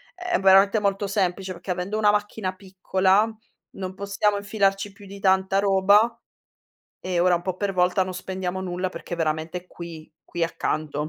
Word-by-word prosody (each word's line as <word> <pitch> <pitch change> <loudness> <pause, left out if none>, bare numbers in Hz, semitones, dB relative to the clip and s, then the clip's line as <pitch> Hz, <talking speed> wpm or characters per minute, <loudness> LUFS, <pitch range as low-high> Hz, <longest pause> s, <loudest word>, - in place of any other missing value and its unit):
è 360 -1 -1
veramente 195 +2 +5
molto 200 0 0
semplice, 190 -1 -1
perché 175 +2 -13
avendo 185 +4 -2
una 210 -1 +4
macchina 205 -2 -1
piccola, 190 +2 +1 0.4
non 185 -1 -5
possiamo 200 +1 0
infilarci 200 -1 0
più 200 +1 -15
di 200 +1 -10
tanta 190 0 +2
roba 200 +4 +4 0.8
e 180 -2 -2
ora 180 0 +4
un 170 - -2
po' 185 -1 -3
per 200 0 -1
volta 185 +1 +2
non 185 - -6
spendiamo 185 0 -4
nulla, 185 0 -2
perché 180 - -7
è - - -8
veramente 165 +2 -2
qui 170 -3 -10
qui 170 -1 -2
accanto. 155 -2 -2
190 Hz, 170 wpm, -24 LUFS, 180-200 Hz, 0.8 s, veramente